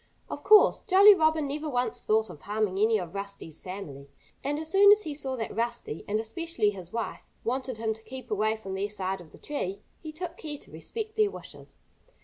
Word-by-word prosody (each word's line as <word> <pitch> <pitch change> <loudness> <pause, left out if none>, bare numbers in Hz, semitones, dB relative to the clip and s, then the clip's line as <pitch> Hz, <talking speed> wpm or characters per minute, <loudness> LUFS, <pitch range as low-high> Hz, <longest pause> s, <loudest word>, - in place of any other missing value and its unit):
Of - - -6
course, 430 -1 +7
Jolly 400 +1 +8
Robin 315 -4 +2
never 300 +2 -3
once 245 -4 -1
thought 220 0 +1
of 145 - -13
harming 205 -2 -1
any 220 +1 +4
of 175 -3 -6
Rusty's 200 -5 -7
family. 150 -8 -8 0.3
And 285 +2 -1
as 315 +1 -5
soon 400 +1 +8
as 420 +1 +6
he 305 - -4
saw 270 -2 -3
that 225 -3 -4
Rusty 235 -8 -3
and 210 +1 0
especially 225 -2 -1
his 185 -3 -9
wife 230 0 -3 0.2
wanted 255 0 -2
him 220 0 -1
to 220 - -10
keep 260 +2 -9
away 215 +1 +1
from 195 -3 -7
their 195 +2 -2
side 190 -2 -3
of 165 - -14
the - - -14
tree, 200 -9 -4 0.2
he 315 - -7
took 345 +3 -6
care 300 -2 -5
to - - -17
respect 440 -1 -6
their 425 -1 +4
wishes. - - -11
230 Hz, 210 wpm, -28 LUFS, 200-310 Hz, 0.3 s, Jolly